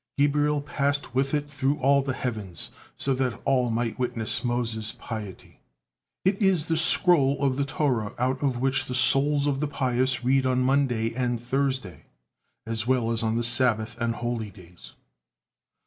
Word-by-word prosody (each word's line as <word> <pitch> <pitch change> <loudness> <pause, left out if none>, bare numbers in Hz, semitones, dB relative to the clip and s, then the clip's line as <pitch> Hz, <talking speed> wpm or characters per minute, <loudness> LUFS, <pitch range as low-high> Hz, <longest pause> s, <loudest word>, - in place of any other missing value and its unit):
Gabriel 145 +1 +2
passed 145 -2 -1
with 135 +3 +1
it 145 0 -2
through 145 0 -1
all 140 +1 +3
the 135 -1 -3
heavens, 110 -9 -4 0.3
so 135 - 0
that 130 -2 -1
all 130 -3 +2
might 115 +1 -2
witness 115 -3 -2
Moses' 115 -3 -1
piety. 105 -5 -8 0.7
It 195 +3 +1
is 190 -6 +3
this 160 -1 +2
scroll 150 -5 +4
of 135 -2 +1
the 140 +1 0
Torah 130 -8 -1
out 130 +2 -1
of 135 -4 0
which 135 +1 +1
the 125 - -4
souls 140 +3 +3
of 140 -2 0
the 150 - -1
pious 130 -2 0
read 130 +1 +2
on 130 0 +1
Monday 125 -4 +1
and 120 -1 -1
Thursday, 130 - -2 0.6
as 115 0 -2
well 125 -3 +1
as 115 0 0
on 110 0 0
the 120 - 0
Sabbath 115 -2 +1
and 115 0 0
holy 120 -3 -3
days. 90 -3 -15
130 Hz, 165 wpm, -26 LUFS, 115-140 Hz, 0.7 s, scroll